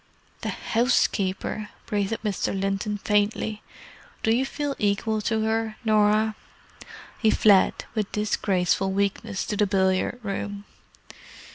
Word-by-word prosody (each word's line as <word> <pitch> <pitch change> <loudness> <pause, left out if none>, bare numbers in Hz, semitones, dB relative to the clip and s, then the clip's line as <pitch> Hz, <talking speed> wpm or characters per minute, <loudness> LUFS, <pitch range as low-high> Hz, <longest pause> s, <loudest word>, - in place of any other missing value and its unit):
"The - - -2
housekeeper!" 215 -3 0 0.2
breathed 205 0 -1
Mr. 195 -1 -1
Linton 195 +2 -1
faintly. 210 +1 0 0.6
"Do 225 +1 +3
you 265 +2 +1
feel 290 -1 -3
equal 210 +1 0
to 220 +1 0
her, 220 0 0
Norah?" 215 0 +3 0.9
He 220 - +3
fled, 205 -3 +4
with 215 -3 -2
disgraceful 195 -2 +1
weakness, 200 +1 -1
to 215 - -2
the 210 - +3
billiard 190 +4 +1
room. 200 0 -4
210 Hz, 115 wpm, -25 LUFS, 200-220 Hz, 0.9 s, fled